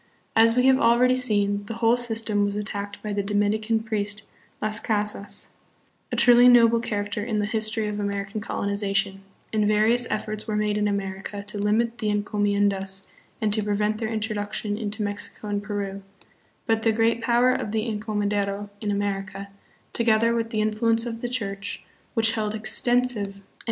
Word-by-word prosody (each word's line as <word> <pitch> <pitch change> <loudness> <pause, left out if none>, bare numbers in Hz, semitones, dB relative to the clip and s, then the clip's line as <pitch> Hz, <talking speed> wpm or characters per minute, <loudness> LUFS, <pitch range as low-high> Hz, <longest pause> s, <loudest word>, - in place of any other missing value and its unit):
As 230 +1 +5
we 250 0 +3
have 265 0 +5
already 240 +2 +4
seen, 205 -5 +1
the 225 - -5
whole 230 0 +3
system 225 -3 +1
was 205 0 -1
attacked 205 -1 -5
by 210 -1 -3
the 200 - 0
Dominican 210 +2 0
priest, 210 -1 -3 0.4
Las 215 0 -1
Casas, 210 -2 -3 0.6
a - - -1
truly 245 0 +7
noble 235 -1 +6
char 205 -3 -2
acter 205 0 -4
in 220 -1 -2
the 205 - +1
history 215 0 0
of 210 0 -3
American 200 +1 -3
colonization, 200 -2 -1 0.3
and 215 -1 +2
various 220 +3 +3
efforts 215 +1 -3
were 215 - -1
made 210 0 +1
in 210 0 +1
America 200 0 -4
to 205 0 -5
limit 225 +3 +1
the 215 - -2
encomiendas 205 -2 0 0.3
and 215 -2 0
to 215 - +3
prevent 210 +1 0
their 220 -2 -2
introduction 210 -1 -2
into 210 0 -3
Mexico 205 +1 -5
and 205 0 -1
Peru; 200 -1 -4 0.6
but 225 0 +1
the 225 - +3
great 225 +1 +1
power 240 +2 +3
of 210 - -3
the 220 0 0
encomendero 205 -2 -2
in 210 - -2
America, 200 -1 -3 0.4
together 230 0 +3
with 230 -1 -1
the 220 -2 -1
influence 225 +2 +1
of 230 -1 -5
the 245 - -2
Church, 200 -5 -4 0.3
which 225 -1 +3
held 215 -1 -2
extensive 240 +3 +2
112 250 - -1
THE 200 -3 -4
PHILIPPINES. 195 - -24
210 Hz, 175 wpm, -25 LUFS, 205-225 Hz, 0.6 s, truly